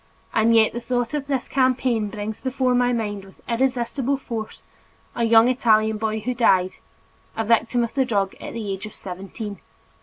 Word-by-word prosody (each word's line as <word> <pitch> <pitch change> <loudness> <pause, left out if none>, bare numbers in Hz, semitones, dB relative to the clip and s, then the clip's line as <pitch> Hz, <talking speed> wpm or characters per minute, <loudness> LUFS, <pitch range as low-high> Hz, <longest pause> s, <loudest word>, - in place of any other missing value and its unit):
And 230 +1 +4
yet 220 -1 +4
the 240 - -4
thought 245 0 -1
of 290 -2 -2
this 270 -3 -1
campaign 255 -4 +1
brings 210 0 -5
before 260 -1 0
my 245 0 +3
mind 210 -4 -2
with 190 -1 -17
irresistible 255 +2 0
force, 230 -5 -6 0.5
a 235 - +1
young 225 +1 +6
Italian 220 -3 +3
boy 220 0 -1
who 250 +4 -2
died, 190 -6 +3 0.7
a 225 - +1
victim 230 +2 +2
of 235 - -4
the 270 - +2
drug 200 -6 0
at - - -7
the 215 -4 -4
age 195 +2 -6
of 215 - -13
seventeen. 195 +3 -7
230 Hz, 180 wpm, -23 LUFS, 215-250 Hz, 0.7 s, young